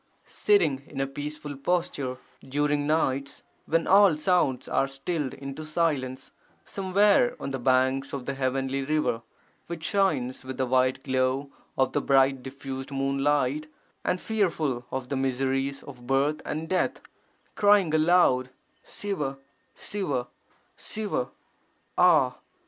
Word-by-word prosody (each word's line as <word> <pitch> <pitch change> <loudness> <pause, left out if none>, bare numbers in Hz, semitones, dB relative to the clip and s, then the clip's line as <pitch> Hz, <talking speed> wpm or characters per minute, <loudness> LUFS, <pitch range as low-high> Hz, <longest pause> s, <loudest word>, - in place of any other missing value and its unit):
Sitting 165 -10 +2
in 135 - -7
a 135 - +1
peaceful 145 +1 -6
posture, 140 -4 -1 0.3
during 145 +1 +1
nights 140 -3 0 0.2
when 165 +1 +2
all 195 -4 +6
sounds 155 -6 +1
are 135 - +1
stilled 135 +1 -3
into 140 +2 -7
silence, 145 -5 -1 0.3
somewhere 200 +5 +3
on 135 - -4
the 135 - -3
banks 130 +2 +2
of 135 -3 -5
the 140 - -2
heavenly 135 0 -1
river 150 -5 0 0.5
which 170 -2 -6
shines 150 -12 0
with 130 0 -6
the 130 - +1
white 130 +1 +2
glow 130 +1 0 0.3
of 130 -1 +2
the 145 - 0
bright 135 -1 +3
diffused 135 0 -7
moonlight, 140 +1 0 0.4
and 180 - 0
fearful 160 - -1
of 130 -1 -4
the 140 - -1
miseries 135 +1 -1
of 125 -3 -12
birth 140 +3 +1
and 155 +1 -3
death, 185 +2 0 0.5
crying 205 -6 +4
aloud 155 -6 +4 0.3
'Siva, 150 -10 -4 0.4
Siva, 145 -12 -3 0.5
Siva,' 205 -12 -3 0.7
ah! - - +4
140 Hz, 125 wpm, -27 LUFS, 130-160 Hz, 0.7 s, all